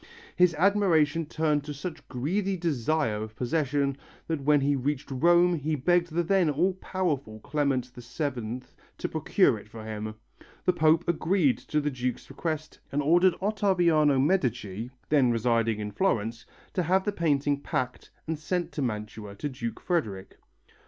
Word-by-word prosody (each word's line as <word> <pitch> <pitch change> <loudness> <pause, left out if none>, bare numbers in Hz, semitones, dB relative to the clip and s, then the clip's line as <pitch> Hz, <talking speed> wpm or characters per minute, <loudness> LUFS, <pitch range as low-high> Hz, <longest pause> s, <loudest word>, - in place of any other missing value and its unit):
His 180 -2 +4
admiration 165 -4 +3
turned 150 -2 0
to 150 -1 -5
such 155 0 -7
greedy 185 +10 -1
desire 150 -7 0
of 110 0 -7
possession 140 +1 0 0.3
that 160 -3 -2
when 145 +1 +4
he 140 +1 +2
reached 140 +1 -2
Rome 175 +6 +4
he 155 -1 -1
begged 175 +4 +2
the 170 +2 +1
then 185 -1 +3
all 170 +6 +2
powerful 155 - -3
Clement 140 -3 0
VII 125 -1 -4 0.4
to - - -2
procure - - +2
it - - -15
for 110 -1 -10
him. 110 0 -5 0.5
The 180 - +4
Pope 160 -1 +4
agreed 165 - +2
to 150 - -1
the 150 0 -1
Duke's 125 -1 -4
request 155 -2 -4
and 145 +1 0
ordered 175 +4 +4
Ottaviano 175 -9 +3
Medici, 125 - 0 0.2
then 140 -5 +4
residing 115 -1 +1
in 105 0 -4
Florence, 115 - -1 0.3
to 185 - +1
have 185 +3 +2
the 205 - 0
painting 145 -5 +1
packed 130 -6 -3 0.2
and 160 -1 -3
sent 175 +2 -2
to 150 - -4
Mantua 105 -3 -4
to 145 +8 -4
Duke 115 -4 -5
Frederick. 105 - -2
150 Hz, 155 wpm, -27 LUFS, 125-170 Hz, 0.5 s, His